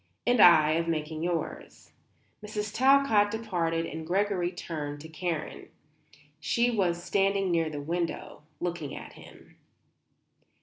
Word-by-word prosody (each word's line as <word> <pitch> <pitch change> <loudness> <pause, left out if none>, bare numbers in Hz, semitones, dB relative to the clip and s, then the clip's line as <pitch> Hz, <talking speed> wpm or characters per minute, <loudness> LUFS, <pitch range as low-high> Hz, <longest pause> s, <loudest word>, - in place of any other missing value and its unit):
"And 245 -1 +3
I 155 -5 +7
of 165 +1 0
making 155 -1 -3
yours." 170 -1 -4 0.5
Mrs. 210 0 -4
Talcott 260 -5 +4
departed 175 -7 -1
and 160 0 -7
Gregory 185 -1 0
turned 150 -5 -6
to 160 - -9
Karen. 160 -1 -4 0.7
She 235 +9 +1
was 175 -6 0
standing 195 -1 +1
near 165 -2 +1
the 145 -2 -5
window, 170 -1 -4 0.2
looking 175 -5 -4
at - - -9
him. - - -16
175 Hz, 125 wpm, -28 LUFS, 160-205 Hz, 0.7 s, I